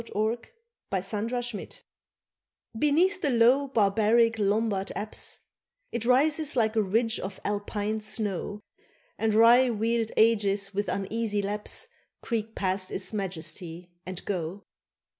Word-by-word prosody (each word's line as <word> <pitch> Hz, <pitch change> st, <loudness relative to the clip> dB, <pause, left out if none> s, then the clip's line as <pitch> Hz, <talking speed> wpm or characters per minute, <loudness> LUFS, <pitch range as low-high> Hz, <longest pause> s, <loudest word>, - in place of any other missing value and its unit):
AUGUSTINE 220 Hz, +3 st, -1 dB, 0.4 s
AT 220 Hz, +6 st, -2 dB
PAVIA 210 Hz, -, -6 dB, 1.1 s
BENEATH 345 Hz, -, +3 dB
the 290 Hz, -, +2 dB
low 250 Hz, +3 st, +4 dB
barbaric 225 Hz, 0 st, +3 dB
Lombard 205 Hz, -1 st, +1 dB
apse 215 Hz, -, -5 dB, 0.5 s
It 235 Hz, -1 st, -2 dB
rises 295 Hz, +4 st, +3 dB
like 220 Hz, -2 st, +2 dB
a 220 Hz, -, +4 dB
ridge 225 Hz, +4 st, +1 dB
of 190 Hz, 0 st, -6 dB
Alpine 205 Hz, +1 st, -2 dB
snow, 210 Hz, -1 st, -3 dB, 0.6 s
And 220 Hz, -1 st, +1 dB
wry 240 Hz, +3 st, +7 dB
wheeled 225 Hz, 0 st, 0 dB
ages 205 Hz, -3 st, +3 dB
with 205 Hz, +1 st, -1 dB
uneasy 205 Hz, +1 st, -1 dB
lapse 210 Hz, -, -2 dB, 0.4 s
Creak 225 Hz, -1 st, -3 dB
past 185 Hz, 0 st, -1 dB
its 190 Hz, -, -4 dB
majesty, 175 Hz, -2 st, -4 dB
and 185 Hz, -1 st, -7 dB
go. 185 Hz, 0 st, -3 dB
215 Hz, 120 wpm, -28 LUFS, 200-230 Hz, 1.1 s, wry